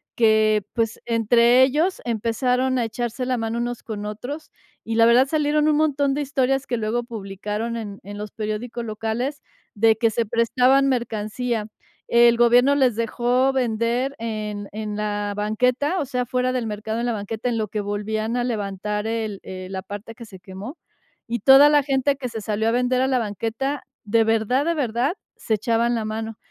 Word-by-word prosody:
que, 215 -2 +3
pues, 225 -2 -1
entre 235 +2 +4
ellos 310 +8 +1
empezaron 250 +3 0
a 240 - +1
echarse 240 +3 -3
la 255 0 0
mano 225 0 -2
unos 240 0 -3
con 210 -2 -6
otros, 250 +9 -6 0.3
y 225 - -4
la 230 0 +6
verdad 245 +3 +5
salieron 300 0 +1
un 300 -1 +3
montón 285 -2 +2
de 290 - -1
historias 270 -1 0
que 240 - -1
luego 225 +2 -1
publicaron 210 +1 -4
en 205 -3 -6
en 205 +2 -8
los 210 0 -5
periódicos 225 +2 -4
locales, 225 +6 -3 0.3
de 220 +1 +4
que 230 0 +2
se 230 +1 -1
prestaban 250 +4 +3
mercancía. 230 -2 -2 0.4
El 235 0 +5
gobierno 245 +4 +5
les 260 -5 +3
dejó 240 +3 +1
vender 245 +1 0
en 210 -2 -4
en 210 -1 -4
la 205 -1 -2
banqueta, 250 - 0
o - - -2
sea, 250 -1 -2
fuera 250 +1 0
del 245 -3 -1
mercado 220 +1 -4
en 240 - -1
la 240 - 0
banqueta, 220 +3 -3
en 235 - -1
lo 215 -1 -1
que 210 +1 -3
volvían 215 +3 -2
a 245 - 0
levantar 210 -2 -3
el 220 -3 -3
el 185 0 -8
la 190 -1 -4
parte 205 +4 -8
que 235 0 -11
se 195 -4 -13
quemó, 190 - -9 0.5
y 235 +1 -2
toda 270 +6 +8
la 295 -1 +5
gente 275 0 +1
que 265 -2 -4
se 225 -1 -6
salió 215 +1 -1
a - - +1
vender 250 +1 +1
a 260 - +2
la 265 -1 +2
banqueta, 230 +6 -3 0.2
de 225 +2 +3
verdad, 225 +5 +1
de 335 - +1
verdad, 255 -1 0 0.2
se 225 - -2
echaban 235 +2 +1
la 225 - -2
mano, 220 0 -4
230 Hz, 190 wpm, -23 LUFS, 215-255 Hz, 0.5 s, toda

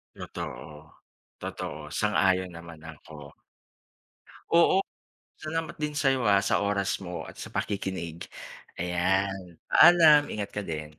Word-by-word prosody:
Totoo. 75 0 -8 0.6
Totoo, 75 0 -6
sang-ayon 95 -2 +1
naman 85 -1 -11
ako. 75 -2 -12 1.2
Oo, 170 +2 +5 0.6
salamat 160 +1 -4
din 150 -1 -3
sa 140 -2 +2
'yo, 130 -3 0
ah, 100 -1 +4
sa 100 - +1
oras 100 -1 0
mo 90 -2 -6
at - - -12
sa - - -7
pakikinig. 95 -5 -4 0.5
Ayan, 90 +1 -1
paalam, 160 -4 +7
ingat 100 -1 -4
ka 105 - -4
din. 75 -1 -6
95 Hz, 120 wpm, -27 LUFS, 85-110 Hz, 1.2 s, paalam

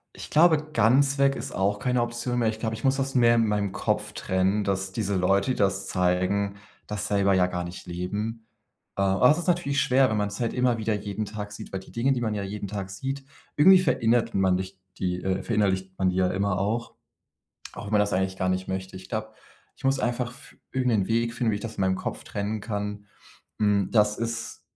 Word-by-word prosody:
Ich - - -9
glaube, 155 -1 +4
ganz 135 +6 +4
weg 140 0 +4
ist - - -5
auch 100 +2 0
keine 125 +2 +1
Option 120 +1 -2
mehr. 115 -2 +2
Ich 110 - -5
glaube, 110 -1 -2
ich 110 - -10
muss 135 0 +3
das 135 0 -1
mehr 120 -2 +5
in 115 - +3
meinem 105 -2 0
Kopf 90 - -1
trennen, 95 +3 0
dass 95 -1 -1
diese 100 -1 -1
Leute, 100 +6 +2
die - - 0
das 100 -1 +1
zeigen, 95 +3 0 0.3
das 105 0 -3
selber 100 -1 +2
ja 95 -1 +4
gar 90 -1 -3
nicht 85 +1 -8
leben. 105 +6 -4 0.5
Äh, - - 0
aber 95 +5 +4
das 150 +5 +5
ist 175 - -4
natürlich 170 -6 +1
schwer, 130 +1 +4
wenn 110 - 0
man's 105 0 -2
halt 115 -2 -1
immer 125 -2 +2
wieder 110 0 0
jeden 105 +1 -4
Tag 105 0 -6
sieht, 105 +1 -9
weil 95 - -3
die - - -15
Dinge, 125 +4 +1
die 125 - 0
man 110 -2 -1
ja 105 - -2
jeden 100 +1 -5
Tag 100 -1 -5
sieht, 135 +7 -4 0.3
irgendwie 185 +6 +8
verinnert 115 -8 +2
man 95 -1 +3
nicht 95 +1 -5 0.2
die, 90 -1 -2
äh 95 0 -1
verinnerlicht 95 -4 0
man 95 - +3
die 90 - -2
ja 95 0 +3
immer 100 0 0
auch, 110 +5 -2 0.8
auch 105 - -7
wenn 105 - -7
man 105 - +4
das 105 0 +1
eigentlich 95 0 -1
gar 95 - 0
nicht 95 0 -1
möchte. 95 0 -4
Ich 95 +1 -11
glaube, 110 -1 -4 0.4
ich - - -20
muss 135 0 +2
einfach 125 0 -1
f - - -16 0.2
irgendeinen 125 -7 +1
Weg 115 +1 +1
finden, 120 -2 +1
wie 105 - 0
ich - - -6
das 115 0 -6
in - - -1
meinem 95 0 +2
Kopf - - -5
trennen 105 +1 -3
kann, 105 -1 -4 0.5
hm: 100 -2 +2
„Das 105 -2 +3
ist 115 0 -4
105 Hz, 230 wpm, -26 LUFS, 95-120 Hz, 0.8 s, irgendwie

